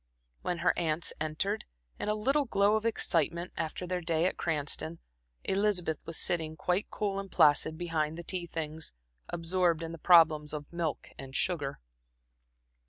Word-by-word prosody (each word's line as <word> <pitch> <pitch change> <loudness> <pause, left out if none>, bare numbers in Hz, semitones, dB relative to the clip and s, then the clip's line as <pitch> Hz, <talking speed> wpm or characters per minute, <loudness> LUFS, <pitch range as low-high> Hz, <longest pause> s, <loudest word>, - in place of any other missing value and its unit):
When 175 - -1
her - - +5
aunts 160 -1 +1
entered, 175 +7 -1 0.4
in - - -2
a 210 - +2
little 275 +7 +2
glow 205 -2 +3
of 220 +1 +1
excitement 170 -4 0
after 165 +2 -3
their 180 0 -2
day 165 0 +1
at 185 - +1
Cranston, 145 - -1 0.5
Elizabeth 190 -5 +1
was 165 - -1
sitting 160 -2 -1
quite 180 +6 0
cool 200 -2 -2
and 195 -2 -7
placid 155 +1 +4
behind 160 -2 -1
the 170 - -6
tea 175 0 -4
things, 160 - -4 0.4
absorbed 170 -1 +1
in 165 - -4
the 165 - -8
problems 155 -3 +5
of 150 +1 -6
milk 165 -4 -2
and 135 0 -8
sugar. 145 -6 0
170 Hz, 160 wpm, -31 LUFS, 155-185 Hz, 0.5 s, her